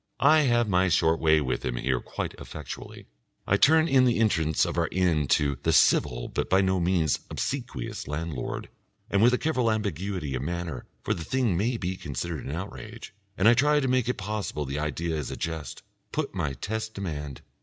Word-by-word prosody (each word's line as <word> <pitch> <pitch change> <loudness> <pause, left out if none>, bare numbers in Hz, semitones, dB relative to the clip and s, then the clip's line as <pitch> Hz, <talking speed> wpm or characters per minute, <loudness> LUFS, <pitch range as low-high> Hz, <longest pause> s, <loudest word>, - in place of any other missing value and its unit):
I 155 +2 +7
have 120 -2 +3
my 95 -1 +3
short 80 0 +3
way 80 -1 +4
with 65 -3 -2
him - - -2
here 65 +1 0
quite - - -5
effectually. 75 -4 -8 0.4
I - - +3
turn 160 +2 +5
in 135 -5 +5
the 120 -2 +3
entrance 80 -9 +2
of - - -3
our - - +1
inn 85 -6 +1
to 70 -2 -1
the - - +1
civil - - +3
but - - -3
by 95 - +4
no 95 -1 +1
means 85 -4 +1
obsequious 120 - -4
landlord, 75 -2 -4 0.4
and 100 - +3
with 120 +2 +6
a 125 - +2
careful 130 -7 +1
ambiguity 95 -7 -2
of 65 - -2
manner 85 -2 -4 0.2
for - - 0
the 85 - -5
thing 125 -2 0
may 115 +7 0
be 90 -2 -3
considered 75 +1 -5
an - - -4
outrage, 105 +7 -7 0.2
and 95 - +4
I 120 - +8
try 150 +4 +3
to 135 - 0
make 125 -2 +1
it 125 - -1
possible 100 -7 -3
the 70 +2 -3
idea 80 +2 -2
is 75 -3 -3
a - - -6
jest 80 -5 -5 0.3
put - - -2
my 70 - -2
test 110 - -4
demand.... 75 -8 -5
90 Hz, 195 wpm, -27 LUFS, 75-110 Hz, 0.4 s, I